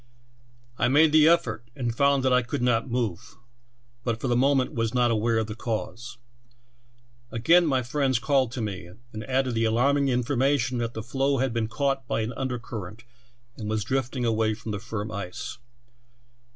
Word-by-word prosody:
I - - +3
made 150 +4 +5
the 155 0 +6
effort, 120 -9 +1
and 120 -4 -2
found 140 0 +3
that 130 - +3
I 125 - +5
could 120 0 -3
not 120 0 +1
move, 115 -8 -3 0.7
but 115 -2 -1
for 130 - -3
the 120 - +2
moment 135 +1 +2
was 115 +1 -1
not 120 -1 +3
aware 115 +1 +1
of 110 - +1
the 105 - -6
cause. 115 +1 -5 1.1
Again 165 +10 +4
my 130 -3 +1
friends 130 0 +1
called 130 0 +1
to 125 - -3
me, 95 -4 -5 0.2
and 110 0 -5
added 130 -1 0
the 115 0 +1
alarming 135 +5 +2
information 125 0 +1
that 115 0 -3
the 110 - -4
floe 135 +3 0
had 130 -2 0
been 115 -2 0
caught 135 +1 -1
by - - 0
an 110 +3 -3
under 130 +1 -3
current 110 -2 -8 0.5
and 105 -2 -5
was 110 -1 -1
drifting 130 0 -2
away 110 -1 +1
from 110 0 -7
the 105 - -3
firm 110 0 -5
ice. 100 +3 -6
120 Hz, 180 wpm, -26 LUFS, 110-135 Hz, 1.1 s, the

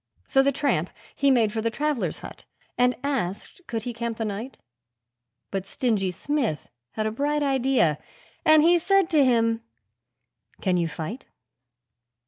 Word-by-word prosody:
So 270 - +3
the 280 +1 +3
tramp 280 +1 0 0.3
he 280 - +2
made 230 -5 +3
for 220 - -1
the 230 - 0
travellers' 295 +2 -1
hut, - - -10 0.3
and 250 0 +3
asked 265 - -3
could 225 -2 -3
he 245 - -4
camp 230 -1 -4
the 225 - -2
night; 215 +5 -5 0.9
But 195 -1 -3
Stingy 215 -7 0
Smith 235 - -2 0.2
had 215 - -2
a 215 - 0
bright 290 +5 0
idea, 265 - +2 0.4
and 310 -1 +6
he 345 +1 +5
said 390 0 +2
to 305 -3 +5
him, 230 -3 +2 1.0
'Can 185 -2 +1
you 170 -1 +1
fight?' 165 - -6
240 Hz, 150 wpm, -25 LUFS, 215-280 Hz, 1.0 s, and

